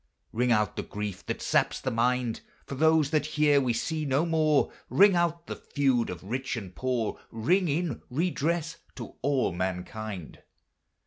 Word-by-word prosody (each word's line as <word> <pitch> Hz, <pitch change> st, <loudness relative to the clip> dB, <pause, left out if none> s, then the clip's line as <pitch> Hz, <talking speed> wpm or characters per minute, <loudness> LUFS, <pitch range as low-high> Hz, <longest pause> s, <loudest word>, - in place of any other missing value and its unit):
Ring 125 Hz, +2 st, +1 dB
out 105 Hz, -3 st, +1 dB
the -, -, 0 dB
grief 105 Hz, -2 st, -5 dB
that -, -, -3 dB
saps -, -, +1 dB
the 130 Hz, -, -2 dB
mind, 120 Hz, 0 st, 0 dB, 0.2 s
For -, -, -7 dB
those 155 Hz, +1 st, +3 dB
that 155 Hz, -1 st, +1 dB
here 145 Hz, -2 st, +5 dB
we 125 Hz, -2 st, +1 dB
see 155 Hz, +6 st, -2 dB
no 140 Hz, +3 st, +1 dB
more; 155 Hz, -3 st, +2 dB, 0.2 s
Ring 200 Hz, -1 st, +6 dB
out 170 Hz, -1 st, 0 dB
the -, -, -5 dB
feud 135 Hz, -5 st, 0 dB
of 90 Hz, 0 st, -7 dB
rich 125 Hz, +5 st, -3 dB
and 95 Hz, -5 st, -7 dB
poor, 125 Hz, -4 st, -1 dB
Ring 170 Hz, -, +1 dB
in 155 Hz, -3 st, -1 dB
redress 165 Hz, +2 st, -1 dB, 0.2 s
to 120 Hz, -, -8 dB
all 135 Hz, -4 st, +1 dB
mankind. 95 Hz, +1 st, -5 dB
135 Hz, 165 wpm, -28 LUFS, 115-160 Hz, 0.2 s, Ring